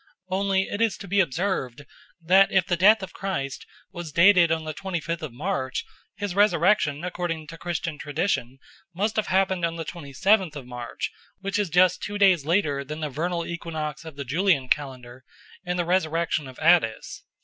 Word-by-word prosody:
Only 190 0 +1
it 205 - -4
is 225 -2 +2
to 200 - -9
be 200 +2 +1
observed 155 -6 -1 0.3
that 185 +4 +4
if 190 -2 +3
the 180 - 0
death 205 +4 +5
of 190 - -8
Christ 140 -9 -4 0.2
was 175 -4 -7
dated 170 +1 +6
on 160 -1 0
the 155 0 -5
twenty 190 +1 -4
fifth 165 +1 -4
of 155 -4 -5
March, 130 -1 -3 0.3
his 205 -2 -4
resurrection, 185 -6 +3
according 175 -3 -3
to 165 - -9
Christian 170 -2 -3
tradition, 145 -4 -2 0.4
must 210 +4 0
have 215 - +1
happened 190 -1 +1
on 165 0 0
the 165 -1 -5
twenty 150 -4 -8
seventh 190 +3 +2
of 140 -4 -7
March, 125 -1 -5 0.3
which 195 +1 -2
is 205 -4 0
just 180 +2 +4
two 205 0 -4
days 185 -7 +4
later 155 -6 +1
than 155 +3 -7
the 150 - -2
vernal 170 +4 -2
equinox 160 -3 -5
of 160 -3 -10
the 140 0 -6
Julian 145 -2 +1
calendar 130 -3 -3 0.4
and 180 -1 -2
the 175 - 0
resurrection 165 -4 0
of 130 - -11
Attis. 160 -9 +2
170 Hz, 185 wpm, -25 LUFS, 150-190 Hz, 0.4 s, dated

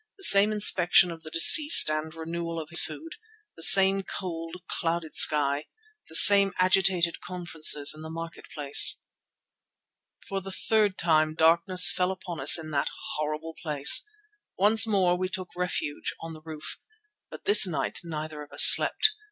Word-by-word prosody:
The 390 - -11
same 200 - +5
inspection 185 -4 +2
of 165 -1 -13
the 155 - -11
deceased 295 - +6
and 155 +1 -6
renewal 165 +1 -9
of 155 -1 -12
his 170 - +4
food; 330 +5 -11 0.4
the - - -17
same 195 +3 +4
cold, 165 -3 -10
clouded 165 -2 -7
sky, 145 -1 +1 0.4
the 160 - -5
same 200 +1 +6
agitated 185 -2 -2
conferences 160 -5 -1
in 155 - -16
the 160 - -12
market 165 +1 -12
place. 145 -2 +1 1.2
For 195 0 -7
the 195 - -12
third 210 0 -3
time 155 -2 -2
darkness 170 +3 +2
fell 180 0 -4
upon 180 -3 -10
us - - +5
in 155 -1 -11
that 140 -2 -4 0.3
horrible 155 +2 -8
place. 150 -2 +2 0.6
Once 215 +4 +2
more 190 -4 -2
we 185 +1 -7
took 185 0 -10
refuge 175 -5 -7
on 165 0 -12
the 155 - -16
roof, 155 -1 -12 0.5
but - - -15
this 410 - +5
night 140 -7 -6
neither 155 -2 -10
of 145 - -16
us - - +2
slept. 435 - +3
170 Hz, 160 wpm, -23 LUFS, 155-190 Hz, 1.2 s, deceased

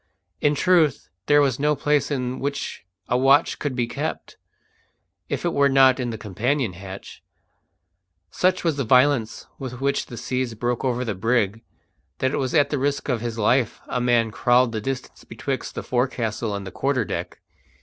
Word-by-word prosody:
In 145 0 +2
truth, 165 -3 +2 0.2
there 145 0 +5
was 135 -3 +1
no 150 +1 +2
place 145 0 +1
in 130 -3 -2
which 140 -9 -4 0.2
a 125 - +1
watch 135 +4 +4
could 145 -3 -2
be 120 -2 +1
kept, 115 - -5 0.9
if - - -3
it - - 0
were 140 0 +4
not 135 -1 +5
in 125 -1 -2
the 115 - -4
companion 110 +3 -1
hatch. 95 +2 -10 1.1
Such 185 - +1
was 165 -4 0
the 140 - 0
violence 125 -1 +2
with 125 -2 -6
which 140 +1 0
the 120 - -9
seas 125 -2 -2
broke 120 +1 -2
over 125 -1 0
the 110 - -2
brig 110 +1 0 0.6
that 130 - 0
it - - 0
was 130 +1 -1
at 145 -2 +3
the 145 - 0
risk 140 +2 -1
of 120 -4 0
his 120 -1 -4
life 120 +2 +1
a 125 - -2
man 120 -2 +2
crawled 120 +2 +3
the 110 -1 -3
distance 135 +3 -5
betwixt - - -5
the - - -4
forecastle 120 -4 -1
and 100 -1 -5
the 95 - -7
quarter 135 -4 0
deck. - - -5
125 Hz, 180 wpm, -23 LUFS, 115-140 Hz, 1.1 s, there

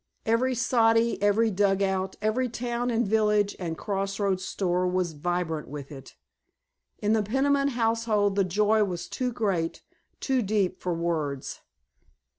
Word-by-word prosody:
Every 250 +3 +2
soddy, 230 -1 +2
every 210 +2 +3
dugout, 195 -1 +1
every 245 +4 +1
town 240 +1 -2
and 235 -2 +1
village 210 -1 +2
and 165 -3 -4
crossroads 195 -1 -1
store 180 -1 0
was 180 -1 0
vibrant 165 0 -2
with 145 0 -8
it. 135 -2 -11 0.9
In 210 +1 +3
the 220 - +3
Peniman 275 +6 +1
household 225 -5 +1
the 200 - +3
joy 210 +4 +2
was 175 -4 -4
too 250 -1 -2
great, 195 -8 -2 0.4
too 265 -2 +1
deep 200 -3 0
for 180 -2 -1
words. 155 -5 -3
205 Hz, 135 wpm, -27 LUFS, 180-230 Hz, 0.9 s, every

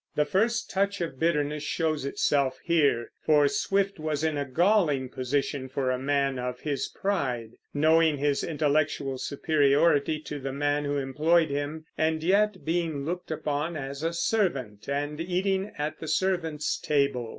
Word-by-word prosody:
The 150 - +2
first 220 +10 0
touch 200 +1 0
of 165 -6 -4
bitterness 150 -2 +1
shows 155 -1 -1
itself 140 -1 +1
here; 145 -9 +2
for 150 -2 +4
Swift 195 +4 0
was 155 -1 -2
in 160 -1 +1
a 145 -1 -1
galling 155 -3 +2
position 130 +1 -2
for 130 -1 -1
a 125 - -1
man 140 -1 0
of 125 0 -4
his 145 -3 -2
pride, 130 - -2 0.2
knowing 155 +1 +3
his 145 0 0
intellectual 145 -3 0
superiority 145 +2 +2
to 150 -1 -6
the 135 0 -4
man 145 +1 0
who 145 0 -1
employed 155 +4 +2
him, 145 +3 -3
and 160 0 +1
yet 200 +2 +2
being 160 -4 -1
looked 175 +3 -4
upon 155 +1 -2
as 140 0 -6
a 165 +1 0
servant 140 - -1
and 145 +2 -2
eating 190 +3 -1
at 150 +1 -3
the 160 - -6
servants' 160 -2 0
table. 140 -5 0
150 Hz, 155 wpm, -27 LUFS, 140-165 Hz, 0.2 s, for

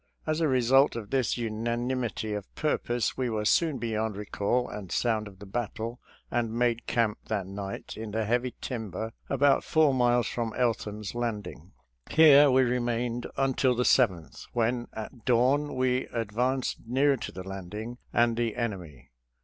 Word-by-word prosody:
As 155 +1 0
a 160 - +3
result 130 +1 +4
of 110 -3 -6
this 130 -3 +1
unanimity 120 0 -2
of 105 -2 -5
purpose 120 -7 0
we 130 -2 0
were 110 -2 -2
soon 155 +4 +3
beyond 110 -2 -2
recall 105 +4 -1
and 100 -4 -8
sound 110 -3 0
of 95 -2 -13
the 100 - -11
battle 115 +2 -4 0.3
and 120 -2 0
made 120 0 0
camp 115 -3 +1
that 105 -4 -1
night 100 0 -6
in 110 0 -6
the 110 +1 -1
heavy 120 +3 0
timber 110 -2 -4 0.2
about 140 0 +3
four 155 -3 +3
miles 120 -1 +3
from 115 -2 -3
Eltham's 110 -4 -1
Landing. 105 - -4 0.4
Here 145 -2 +7
we 130 0 +5
remained 120 -1 -1
until 130 -1 +2
the 125 - +1
7th, 95 -12 +1
when 120 +1 0
at 110 +2 -8
dawn 130 +5 +2
we 130 0 +1
advanced 120 +4 -1
nearer 135 +3 +3
to - - -6
the 95 0 -8
landing 105 +6 -6
and 120 -1 +3
the 115 -2 -1
en 115 -2 0
emy. 85 -9 -11
120 Hz, 160 wpm, -28 LUFS, 110-125 Hz, 0.4 s, Here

